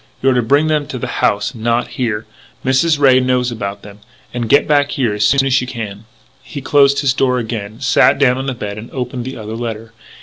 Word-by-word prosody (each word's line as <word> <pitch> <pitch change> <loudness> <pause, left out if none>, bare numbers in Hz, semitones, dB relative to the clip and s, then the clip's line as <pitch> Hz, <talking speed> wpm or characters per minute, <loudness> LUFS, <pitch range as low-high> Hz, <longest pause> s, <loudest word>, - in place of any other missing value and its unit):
You're 135 0 +2
to 125 - +2
bring 140 +6 +2
them 150 -2 0
to 135 - -5
the - - -4 0.2
house, 105 +5 +1
not 115 0 -1
here. 115 -3 -3 0.4
Mrs. 140 +5 +2
Ray 135 -3 +5
knows 125 -1 0
about 100 -3 -5
them. 105 0 -12 0.3
And 120 -2 -3
get 140 - +4
back 145 -1 +3
here 120 -6 0
as 105 0 +2
soon 135 +2 +3
as 135 -1 +2
you 125 - -5
can." 110 -4 -7 0.4
He - - -8
closed 140 0 +3
his 135 -3 +2
door 130 -2 +1
again, 110 -2 -5
sat 130 -1 +4
down 130 -2 +2
on 135 - -4
the 135 - -2
bed 105 -2 -6
and 110 - -10
opened 125 -1 -5
the 130 - -6
other 110 0 -6
letter. 115 -1 -6
125 Hz, 225 wpm, -16 LUFS, 110-135 Hz, 0.4 s, Ray